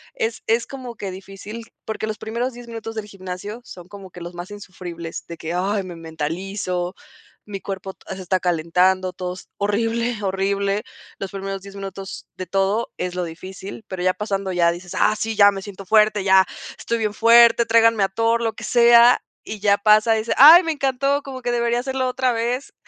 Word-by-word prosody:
es 455 -2 -2
es 230 +1 +2
como 255 -3 -8
que 200 -3 -5
difícil, 195 +4 -9
porque 220 0 -4
los 215 0 -4
primeros 235 +4 -3
10 240 0 -11
minutos 225 -1 -7
del 220 -1 -4
gimnasio, 200 +3 -7
son 180 -7 -12
como 200 -2 -11
que 175 - -12
los 175 +1 -7
más 175 +3 -8
insufribles, 175 -4 -8
de 170 -1 -8
que: 165 +1 -5
"Ay, 195 +3 0
me 180 -2 -8
mentalizo, 175 +3 -4 0.5
mi 200 -2 -7
cuerpo 190 -1 -6
to - - -26
se 190 - -8
está 185 +1 0
calentando, 180 +2 +1
todo 180 0 -4
es 185 - -13
horrible, 225 +2 -1
horrible". 195 +1 0 0.4
Los 195 - -5
primeros 195 0 -5
10 200 0 -12
minutos 195 0 -7
de 185 - -6
todo 195 +4 0
es 180 0 -3
lo 180 - -1
difícil, 190 +5 -8
pero 185 -1 -5
ya 185 0 +3
pasando 195 -2 -3
ya 170 -1 +3
dices: 175 +1 -9
"Ah, 215 - +3
sí, 220 0 -3
ya 205 -1 +7
me 195 -1 -6
siento 195 -1 -9
fuerte, 215 0 +4
ya 190 -1 +6 0.3
estoy 235 - -2
bien 215 -2 -1
fuerte, 235 +1 +6
tráiganme 225 -2 +4
a 195 - +1
Thor, 230 +3 +1
lo 225 -1 0
que - - -8
sea", 235 0 +6 0.2
y 215 -1 -6
ya 200 -1 +4
pasa, 215 +2 +5
dices: 220 +1 -1
"Ay, 315 +6 +10
me 325 -2 -1
encantó, 275 0 0
como 265 -2 -8
que 245 - -1
debería 235 0 +1
hacerlo 260 0 -2
otra 255 0 0
vez", 240 +4 -2
200 Hz, 200 wpm, -22 LUFS, 185-230 Hz, 0.5 s, Ay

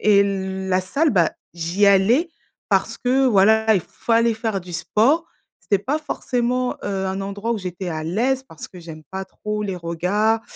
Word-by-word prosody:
et 200 -1 +5 0.5
la 185 0 +2
salle, 285 - +1
bah, 170 -7 +3 0.2
j'y 170 +5 0
allais 215 - +4 0.4
parce - - +1
que 260 +2 +2
voilà, 220 0 +4
il 190 - +2
fallait 230 +6 +1
faire 220 -3 -2
du 175 0 -11
sport. 270 - +2 0.3
C'était 200 -2 0
pas 290 +7 0
forcément, 250 -4 -1
heu, 195 -1 -2
un 190 +1 -3
endroit 200 +3 -4
où 220 - -2
j'étais 185 0 -5
à 155 -2 -4
l'aise 250 +10 0
parce 160 - -10
que 180 - -13
j'aime 160 -2 -10
pas 190 0 -4
trop 210 +2 -5
les 195 -2 -3
regards 180 +7 0
205 Hz, 175 wpm, -22 LUFS, 185-235 Hz, 0.5 s, et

